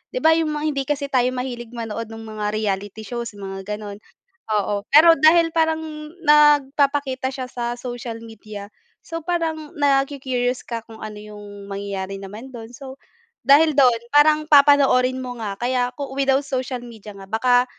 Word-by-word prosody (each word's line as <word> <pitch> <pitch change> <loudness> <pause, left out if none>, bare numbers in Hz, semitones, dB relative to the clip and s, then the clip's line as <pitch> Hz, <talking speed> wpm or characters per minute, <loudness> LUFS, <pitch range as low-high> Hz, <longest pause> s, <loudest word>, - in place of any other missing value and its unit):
'di - - -3
ba 320 - +6
yung 320 0 +2
mga 300 0 -3
hindi 275 -1 -2
kasi 280 -1 -2
tayo 250 -2 +3
mahilig 245 -2 -6
manood 230 -1 -5
nung 225 0 -9
mga 215 -1 -4
reality 205 0 -3
shows 235 -2 -6
mga 195 -1 -8
gano'n. 210 -1 -8 0.5
Oo, 205 -1 0
pero 320 +3 +8
dahil 330 +2 +5
parang 320 -1 +2 0.5
nagpapakita 285 -2 +3
siya 255 -1 -5
sa 240 0 -3
social 240 -2 -6
media, 215 -2 -10 0.4
so 330 -1 -5
parang 320 -3 -2
naku-curious 270 -3 0
ka 230 -2 -4
kung 225 -1 -13
ano 215 -1 -7
yung 205 -1 -11
mangyayari 195 -1 -4
naman 205 +6 -9
do'n. 230 -3 -9
So, 270 +2 -10 0.5
dahil 305 +3 +6
do'n 245 -4 +4
parang 300 +1 +5
papanoorin 275 -3 +5
mo 250 -1 -5
nga 205 -3 -4
kaya 245 +1 0
kung 280 -2 -5
without 270 0 +2
social 260 -1 -3
media 225 -3 -11
nga 195 - -10
baka 245 +2 +3
250 Hz, 160 wpm, -21 LUFS, 215-280 Hz, 0.5 s, pero